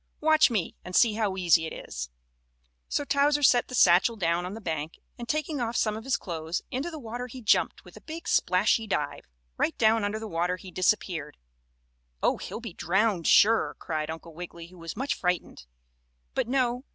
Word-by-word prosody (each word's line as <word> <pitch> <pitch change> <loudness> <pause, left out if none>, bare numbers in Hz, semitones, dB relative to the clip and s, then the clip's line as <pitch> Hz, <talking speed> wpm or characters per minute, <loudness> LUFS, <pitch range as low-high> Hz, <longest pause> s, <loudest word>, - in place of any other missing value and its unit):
Watch 315 0 +5
me 210 -8 -2
and 180 0 -6
see 230 -3 +5
how 210 -3 -1
easy 170 -3 +3
it - - -8
is." - - -5 0.8
So 290 - -1
Towser 290 +1 +2
set 245 -2 +5
the 255 - -6
satchel 190 +2 +5
down 175 -2 0
on 190 - -6
the - - -7
bank 160 -5 -4 0.2
and, 235 - -7
taking 305 -2 -1
off 235 0 -2
some 215 -1 +1
of 220 +2 -8
his 270 - +1
clothes, 165 -2 -4
into 270 +7 -2
the 320 - -7
water 245 -1 -6
he 255 +1 -9
jumped 220 -3 +1
with - - -14
a - - -12
big 330 +2 -8
splashy 215 +4 +2
dive. 200 - -2 0.3
Right - - 0
down 220 -1 +3
under 205 +1 -1
the 220 0 -6
water 175 0 0
he 185 -1 -11
disappeared. 180 -5 0 0.9
"Oh, - - +3
he'll - - -6
be 230 -6 -8
drowned, 185 +1 +1
sure!" 225 +2 +5
cried 155 -2 -3
Uncle 165 +1 -7
Wiggily, 170 0 -9
who 180 -1 -16
was 165 +4 -7
much 270 +3 0
frightened. 180 - -3 0.7
But, - - 0
no. 250 -1 0
210 Hz, 195 wpm, -27 LUFS, 170-245 Hz, 0.9 s, Watch